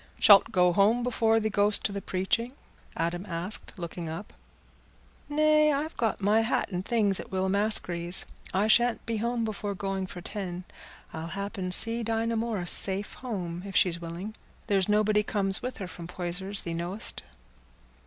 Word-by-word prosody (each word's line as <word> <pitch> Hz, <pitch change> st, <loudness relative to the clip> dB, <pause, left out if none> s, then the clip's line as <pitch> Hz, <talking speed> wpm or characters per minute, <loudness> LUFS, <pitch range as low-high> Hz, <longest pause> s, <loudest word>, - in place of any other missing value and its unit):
"Shalt 200 Hz, -2 st, +7 dB
go 180 Hz, -1 st, +3 dB
home 215 Hz, +6 st, +3 dB
before 225 Hz, -2 st, +2 dB
thee 220 Hz, 0 st, -2 dB
go'st 205 Hz, 0 st, +1 dB
to 215 Hz, -, 0 dB
the 200 Hz, 0 st, -5 dB
preaching?" 210 Hz, +8 st, -1 dB, 0.4 s
Adam 170 Hz, +2 st, -2 dB
asked, 180 Hz, +5 st, +1 dB
looking 170 Hz, -1 st, -6 dB
up. 165 Hz, +6 st, -7 dB, 1.0 s
"Nay; 305 Hz, 0 st, +4 dB
I've 295 Hz, +3 st, -2 dB
got 225 Hz, -3 st, -1 dB
my 210 Hz, +3 st, +3 dB
hat 225 Hz, -2 st, -1 dB
and 180 Hz, 0 st, -3 dB
things 205 Hz, -4 st, +1 dB
at -, -, -8 dB
Will 190 Hz, 0 st, -1 dB
Maskery's. 185 Hz, -4 st, 0 dB, 0.3 s
I 200 Hz, +3 st, +1 dB
shan't 240 Hz, +2 st, +4 dB
be 230 Hz, -1 st, -2 dB
home 235 Hz, +1 st, -1 dB
before 205 Hz, -2 st, -4 dB
going 195 Hz, 0 st, -3 dB
for 180 Hz, -, -9 dB
ten. 180 Hz, -1 st, -6 dB, 0.5 s
I'll 160 Hz, 0 st, -5 dB
happen 195 Hz, 0 st, -5 dB
see 230 Hz, +5 st, +4 dB
Dinah 225 Hz, 0 st, -1 dB
Morris 220 Hz, -6 st, +1 dB
safe 195 Hz, +1 st, +4 dB
home, 180 Hz, -9 st, -5 dB
if 195 Hz, -1 st, -8 dB
she's 170 Hz, -2 st, +2 dB
willing. 170 Hz, +6 st, -6 dB, 0.3 s
There's 195 Hz, -1 st, +1 dB
nobody 210 Hz, 0 st, +3 dB
comes 195 Hz, -2 st, 0 dB
with 250 Hz, +1 st, -5 dB
her 190 Hz, -, -6 dB
from 170 Hz, -1 st, -9 dB
Poyser's, 180 Hz, +3 st, -3 dB
thee 170 Hz, -, -4 dB
know'st." 175 Hz, +6 st, -1 dB
200 Hz, 165 wpm, -28 LUFS, 180-225 Hz, 1.0 s, Shalt